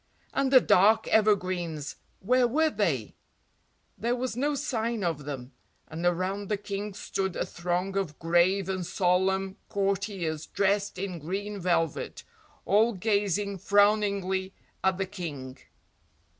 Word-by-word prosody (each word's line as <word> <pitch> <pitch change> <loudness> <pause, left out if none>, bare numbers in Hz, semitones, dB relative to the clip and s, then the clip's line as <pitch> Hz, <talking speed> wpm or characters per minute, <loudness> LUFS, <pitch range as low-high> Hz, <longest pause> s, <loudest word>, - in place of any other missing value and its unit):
And 275 -1 +1
the 260 - +9
dark 215 0 +4
evergreens, 180 -8 +1 0.2
where 250 +4 +3
were 310 +6 +2
they? 165 - -1 0.9
There 235 +2 0
was 250 -1 -3
no 285 +4 0
sign 235 -6 -2
of 160 -5 -2
them, 135 -3 -6 0.4
and 160 +2 -6
around 185 +3 -1
the 210 - +1
king 200 0 -5
stood 190 -2 -3
a - - -1
throng 180 +3 -2
of 185 -7 -2
grave 175 +3 +2
and 190 -1 -2
solemn 190 +2 +1
courtiers 195 -6 -1
dressed 200 0 0
in 185 -2 -4
green 200 +6 -4
velvet, 170 -4 -1 0.4
all 220 +4 +4
gazing 200 -1 0
frowningly 200 -2 +2 0.3
at 190 -1 +2
the 190 - -1
King. 155 -10 -7
195 Hz, 130 wpm, -28 LUFS, 175-210 Hz, 0.9 s, the